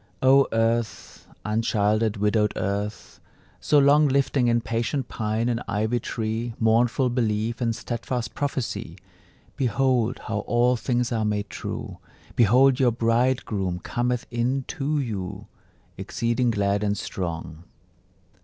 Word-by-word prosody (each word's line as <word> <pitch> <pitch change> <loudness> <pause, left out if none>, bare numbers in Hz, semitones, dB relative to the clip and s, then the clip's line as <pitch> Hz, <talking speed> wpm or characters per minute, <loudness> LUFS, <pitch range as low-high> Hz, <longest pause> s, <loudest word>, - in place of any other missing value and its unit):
O 135 +1 +6
earth, 115 0 -1 0.2
unchilded, 110 0 +1
widowed 105 +1 +1
Earth, 100 +2 -4 0.4
so 150 - +2
long 145 +2 +5
Lifting 135 -2 +2
in 120 0 +3
patient 115 +3 -2
pine 110 +1 -1
and 120 -1 -1
ivy 110 +3 0
tree 115 +1 -3
Mournful 120 +3 +2
belief 115 -1 -1
and 115 -2 0
steadfast 120 0 -4
prophecy, 115 - -3 0.6
Behold 125 -1 +1
how 105 -1 -2
all 120 +1 +3
things 120 0 -1
are 115 -2 0
made 105 -1 -2
true! - - -6 0.4
Behold 125 +4 +5
your 125 -3 +4
bridegroom 115 -5 0
cometh 120 +6 -2
in 125 +3 0
to 150 +2 -1
you, 100 -8 -4 0.5
Exceeding 120 +1 0
glad 100 -1 0
and 100 0 0
strong. 85 -3 -5
115 Hz, 120 wpm, -25 LUFS, 105-125 Hz, 0.6 s, O